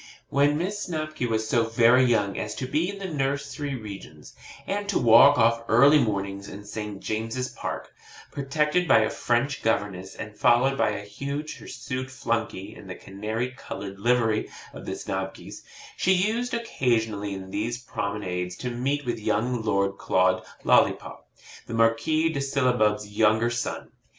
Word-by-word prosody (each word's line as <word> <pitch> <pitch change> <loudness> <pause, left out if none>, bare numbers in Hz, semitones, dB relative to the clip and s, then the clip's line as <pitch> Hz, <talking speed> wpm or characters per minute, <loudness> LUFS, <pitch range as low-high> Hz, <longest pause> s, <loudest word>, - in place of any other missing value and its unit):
When 145 +1 +3
Miss 195 +5 -2
Snobky 155 -6 -3
was 110 -1 -1
so 115 +1 +2
very 115 +3 +5
young 105 -5 +2
as - - -4
to 130 - -4
be 155 +7 0
in 200 - -6
the 195 - -6
nursery 140 -2 -2
regions, 100 -9 -9 0.3
and 205 +1 -3
to 200 - +2
walk 130 +5 +7
off 115 0 +3
early 140 +6 +6
mornings 100 -4 -2
in 100 +1 -9
St. 105 -1 -6
James's 115 +5 -3
Park, - - -6 0.4
protected 150 +5 0
by 115 - +6
a 110 - 0
French 125 +3 0
governess 100 -4 -1
and 105 0 -8
followed 125 +5 +4
by 135 - +2
a 105 -1 -4
huge 140 +8 -5
hirsute 130 +1 -5
flunkey 115 -5 -3
in 105 - -12
the 90 - -6
canary 110 +6 -4
coloured 100 -6 -8
livery 115 -1 +2 0.2
of - - -10
the - - -2
Snobkys, 95 0 -5 0.3
she 190 - +3
used 220 +7 0
occasionally 110 - -1
in 95 0 -8
these 115 +4 -2
promenades 90 -5 -3
to 125 - -4
meet 135 +4 -1
with 120 -2 -2
young 115 +3 0
Lord 100 -2 0
Claude 95 0 +2 0.2
Lollipop, - - +2 0.4
the 115 - -4
Marquis 155 +8 +2
of 140 - -1
Sillabub's 125 -6 +1
younger 110 +2 +3
son. 120 0 -4
115 Hz, 155 wpm, -26 LUFS, 105-140 Hz, 0.4 s, walk